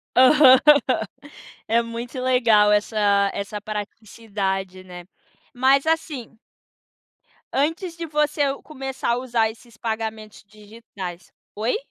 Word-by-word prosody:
Aham, 260 0 +7 1.1
é 230 +1 +3
muito 235 +3 -7
legal 230 -5 +3
essa 205 -1 +2
essa 200 +1 -5
praticidade, 200 -3 -5
né, 180 -1 -11 0.5
mas 270 +3 +3
assim 295 -8 -2 1.2
antes 325 +5 -1
de 340 -1 -6
você 300 -1 -1 0.2
começar 270 -4 -5
a - - -1
usar 235 -3 0
esses 225 0 -15
pagamentos 220 -2 -5
digitais 205 -4 -10 0.2
oi? 220 +4 -1
225 Hz, 100 wpm, -22 LUFS, 210-260 Hz, 1.2 s, Aham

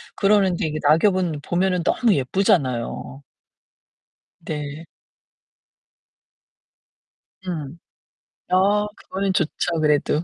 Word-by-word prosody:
그러는데 195 -4 +2
이게 155 0 -3
낙엽은 165 0 +2
보면은 180 +1 0
너무 225 +4 +2
예쁘잖아요. 135 - 0 1.2
네. 150 +1 -6 2.6
음. 160 -3 -5 0.7
아. 200 +3 +3
그거는 195 0 -3
좋죠, 170 -1 -1
그래도. 150 +1 +1
170 Hz, 175 characters per minute, -22 LUFS, 150-190 Hz, 2.6 s, 아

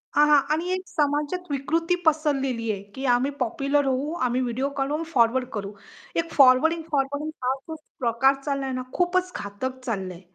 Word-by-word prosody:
हां, 295 - +6
हां. 290 -2 +7
आणि 340 +3 -1
एक 370 0 0
समाजात 295 +4 0
विकृती 330 +6 0
पसरलेली 275 -7 +1
आहे, 200 -1 -4
की 270 +1 -4
आम्ही 260 +4 +1
पॉप्युलर 275 +4 +1
होऊ, 270 +3 0
आम्ही 250 +1 +1
व्हिडिओ 255 +3 -1
काढून 295 +4 -1
फॉरवर्ड 245 +1 +3
करू. 200 -1 -4 0.4
हे 335 - +3
फॉरवर्डिंग, 295 +5 +5
फॉरवर्डिंग 285 +2 -1
हा 255 +1 +2 0.2
जो 320 - -4 0.2
प्रकार 255 +3 +3
चालला 275 -2 -2
आहे 265 - -3
ना, 255 - -2
खूपच 365 +1 +1
घातक 255 +6 -5
चाललं 190 -6 -3
आहे. 170 - -13
275 Hz, 175 wpm, -25 LUFS, 250-300 Hz, 0.4 s, हां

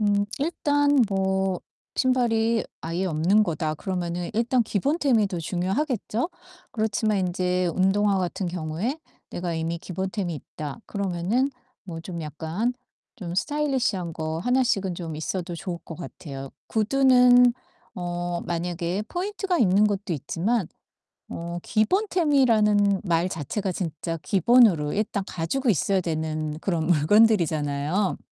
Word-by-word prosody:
음 205 -1 +2
일단 290 -2 +2
뭐 190 -1 0 0.4
신발이 235 -3 +2 0.2
'아예 170 +3 -2
없는거다.' 165 -1 +1
그러면은 175 0 -3
일단 240 +2 +2
기본템이 240 - +1
더 190 -3 -4
중요하겠죠? 215 - -1 0.4
그렇지만 215 -1 0
인제 180 0 0
운동화 195 +1 +2
같은 185 +1 -2
경우에 175 - -3 0.3
'내가 175 -1 -3
이미 165 +1 -2
기본템이 190 0 -3
있다.' 145 0 -7
그러면은 200 +7 0 0.3
뭐 170 -4 -7
좀 170 0 -6
약간 160 - -2 0.4
좀 180 -7 -6
스타일리시한 260 - 0
거 160 0 -3
1 250 +8 +2
씩은 195 -7 0
좀 165 -3 -6
있어도 175 +2 -3
좋을 175 0 -5
것 165 - -8
같아요. 135 -5 -8 0.2
구두는 250 +1 +5 0.4
어 175 -1 -3
만약에 175 +2 -2
포인트가 380 0 -2
있는 200 -1 +4
것도 200 -2 -2
있지만 170 - -1 0.6
어 170 +1 -5
기본템이라는 225 - +3
말 170 -1 +1
자체가 185 - -3
진짜 165 -1 -4
기본으로 190 -2 +4
일단 205 -1 -1
가지고 245 - -2
있어야 195 0 +2
되는 155 -2 -3
그런 165 -4 -1
물건들이잖아요. 165 -1 +3
190 Hz, 285 characters per minute, -25 LUFS, 170-225 Hz, 0.6 s, 구두는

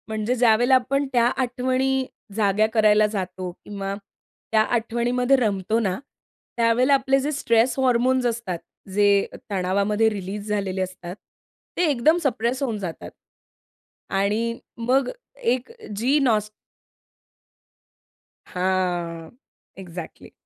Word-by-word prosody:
म्हणजे 220 +2 -1
ज्यावेळेला 245 +1 +4
आपण 275 +2 +1
त्या 240 -1 +4 0.2
आठवणी 260 +1 0 0.3
जाग्या 210 0 +2
करायला 215 -1 +5
जातो 185 -3 -4
किंवा 195 +2 -6 0.6
त्या 220 -1 +5
आठवणीमध्ये 240 +3 +1
रमतो 215 -2 0
ना, 190 -5 -1 0.6
त्यावेळेला 235 +4 +3
आपले 270 0 +3
जे 285 +3 -1
स्ट्रेस 245 -3 +2
हार्मोन्स 255 0 +2
असतात 230 -7 -2 0.3
जे 200 0 +4 0.3
तणावामध्ये 200 +3 +1
रिलीज 205 0 -5
झालेले 195 -2 -1
असतात, 185 -1 -5 0.6
ते 360 - +2
एकदम 295 +5 +3
सप्रेस 250 -1 0
होऊन 230 -5 -1
जातात 160 - -6 1.0
आणि 215 +4 0 0.2
मग 250 +3 +1 0.4
एक 250 0 -2 0.3
जी 255 +7 +2
नॉस 215 -6 +1 1.9
हां, 180 -3 -2 0.5
एक्झॅक्टली. 175 -3 -9
220 Hz, 105 wpm, -23 LUFS, 195-250 Hz, 1.9 s, करायला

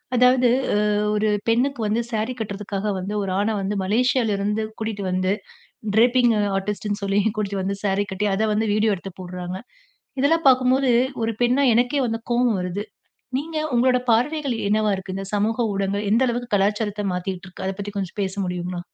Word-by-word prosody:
அதாவது 250 +1 +5 0.3
அ - - +3 0.4
ஒரு 210 +1 +1 0.2
பெண்ணுக்கு 250 +4 +1
வந்து 225 +3 +1
சாரி 220 +3 -1
கட்டுறதுக்காக 205 -1 -3
வந்து, 190 +3 -4
ஒரு 190 - -3
ஆண 210 - +1
வந்து, 195 +2 -2
மலேசியால 230 +2 +2
இருந்து 210 +2 -1 0.2
கூட்டிட்டு 220 -2 -3
வந்து, 185 +1 +1 0.6
ட்ரேப்பிங்க் 240 0 +5 0.2
ஆர்டிஸ்ட்டுன்னு 205 +1 -3
சொல்லி 195 0 +1 0.2
கூட்டிட்டு 200 -2 -2
வந்து 195 +1 -2
சாரி 200 0 +1
கட்டி, 205 +2 -1
அத 215 +3 +1
வந்து 220 +1 0
வீடியோ 215 -1 +2
எடுத்துப் 190 +1 -10
போடுறாங்க. 180 0 -6 0.6
இதெல்லாம் 325 +3 +2
பாக்கும்போது, 255 0 +3 0.3
ஒரு 225 0 0
பெண்ணா 250 +4 +3
எனக்கே 250 +4 +2
வந்து 225 0 -2
கோபம் 240 -4 +2
வருது. 180 +4 -3 0.5
நீங்க 315 +3 -4 0.2
உங்களோட 250 +1 +4
பார்வைகள் 275 +4 +1 0.2
என்னவா 215 0 +2
இருக்கு? 190 0 -6
இந்தச் 195 +1 -6
சமூக 225 +3 +1
ஊடகங்கள் 200 +1 -1
எந்த 230 - +4
அளவுக்கு 240 -1 -3
கலாச்சாரத்த 205 +1 0
மாத்திட்டு 180 +1 -4
இருக்கு? 185 +1 -8
அதப் 190 0 -3
பத்தி 205 +1 -4
கொஞ்சம் 190 +1 -4
பேச 190 -1 -2
முடியுங்களா? 180 0 -3
210 Hz, 170 wpm, -23 LUFS, 195-240 Hz, 0.6 s, அதாவது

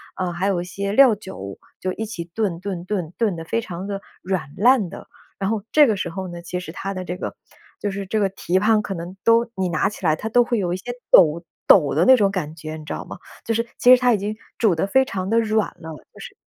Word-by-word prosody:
啊， 185 -2 -2
还 180 +3 -1
有 190 -3 +1
一 175 - -6
些 200 +2 -4
料 245 0 +6
酒， 100 - -9 0.2
就 185 - -2
一 220 - -4
起 210 -6 -6
炖 175 -1 -2
炖 185 -3 -5
炖， 180 -5 -3
炖 215 -6 +1
得 165 - -6
非 230 +7 -1
常 185 -2 -7
地 200 -1 -4 0.2
软 175 -7 -3
烂 230 -2 +4
的。 - - -10 0.3
然 195 0 -1
后 215 -2 -1
这 300 -3 +6
个 220 - +2
时 185 -3 -3
候 190 +2 -5
呢， 175 -1 -8
其 180 +1 -4
实 180 - -8
它 195 +1 -4
的 185 -1 -5
这 180 +1 -4
个 - - -5 0.4
就 205 - -2
是 195 0 -5
这 215 +3 -1
个 200 - +3
蹄 185 -1 -1
膀 215 +1 +3
可 200 - -5
能 175 +1 -7
都 230 +1 +4
你 190 -1 -1
拿 155 -3 +1
起 205 -3 -6
来 155 -1 +4
它 220 - -6
都 245 +2 +4
会 235 0 -1
有 175 -2 -1
一 - - -2
些 240 +6 -6 0.2
抖 170 -1 +6 0.2
抖 150 -8 +6
的 160 - +3
那 260 - +8
种 205 -4 +3
感 160 -5 -4
觉， 155 -1 -7
你 155 - -10
知 - - -4
道 - - -6
吗？ - - -9 0.3
就 230 - 0
是 230 +1 0
其 250 - +7
实 - - -2
它 250 -1 +4
已 - - +2
经 205 +2 -4 0.2
煮 220 -6 +4
得 160 - 0
非 265 +6 +4
常 190 -5 -4
地 230 +1 +3
软 220 -1 +1
了 160 - -9 0.2
就 - - -15
是 - - -10
195 Hz, 290 characters per minute, -22 LUFS, 175-220 Hz, 0.4 s, 那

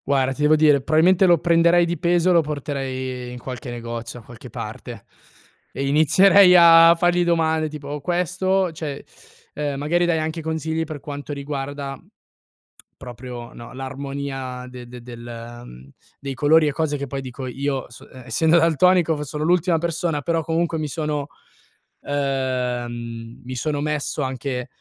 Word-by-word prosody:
Guarda, 135 -1 +2
ti 150 - -8
devo 150 +1 +5
dire, 150 -3 +4
probabilmente 175 +6 +4
lo 175 -1 +6
prenderei 170 +1 +4
di 170 0 -2
peso, 175 +1 +2
lo 170 -2 +5
porterei 130 -4 -4
in 125 - -8
qualche 125 +1 -7
negozio, 115 0 -6
da 110 - -17
qualche 120 -2 -12
parte - - -8 0.7
e 140 - -3
inizierei 180 +6 +6
a 165 0 +8
fargli 175 +1 +2
domande 160 -2 +1
tipo: 145 -1 -7
"Questo?", 180 +3 0
cioè, 155 -3 -6 0.5
ehm, 145 -2 -3
magari 170 +5 +1
darei 170 -2 +1
anche 160 +1 -3
consigli 160 0 -2
per 155 -2 -7
quanto 145 +1 -7
riguarda 140 -1 -5 1.0
proprio, 125 -1 -9
no, 120 - -11
l'armonia 135 -1 -5
de 125 -1 -10
de 125 0 -10
del 120 0 -9
mhmm, 65 - -13 0.3
dei 140 -1 -5
colori 150 +4 +4
e 145 - -1
cose 150 -1 -1
che 140 0 -5
poi 135 +1 -4
dico 130 0 -7
io, 135 +1 -3 0.4
essendo 160 +7 +3
daltonico, 165 -1 +3
sono 150 +2 -4
l'ultima 175 0 +2
persona, 165 -2 -2
però 165 +2 -1
comunque 165 +1 -1
mi 155 -1 -3
sono 150 -2 -3 0.8
ehm, 125 -4 -3
mi 130 +1 -6
sono 145 +4 -2
messo 150 0 -2
anche 130 -1 -4
145 Hz, 150 wpm, -22 LUFS, 130-165 Hz, 1.0 s, a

